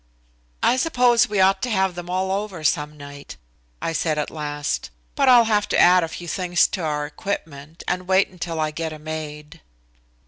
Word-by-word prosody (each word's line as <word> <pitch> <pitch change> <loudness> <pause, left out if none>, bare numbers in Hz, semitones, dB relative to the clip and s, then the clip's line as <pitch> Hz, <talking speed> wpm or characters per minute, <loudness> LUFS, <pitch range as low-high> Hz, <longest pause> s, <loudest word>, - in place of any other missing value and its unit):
"I 255 - +4
suppose 250 -6 +3
we 205 -2 -1
ought 190 0 +4
to 250 - -2
have 190 -4 +1
them 175 0 -8
all 185 +1 -1
over 195 -4 -3
some 150 0 0
night," 145 0 -10 0.5
I 165 - -1
said 155 -1 0
at 150 - -2
last, 145 -1 -3 0.2
"but 275 -2 +3
I'll 245 -2 +8
have 210 -2 +1
to - - +1
add 180 0 +6
a - - -1
few 175 +2 -8
things 180 0 +2
to 190 - -4
our 150 -2 -1
equipment, 155 -2 -6
and 180 0 -2
wait 190 +1 +4
until 175 -3 -5
I 155 -1 0
get 160 0 -4
a - - -8
maid." 155 0 -7
175 Hz, 195 wpm, -22 LUFS, 150-190 Hz, 0.5 s, I'll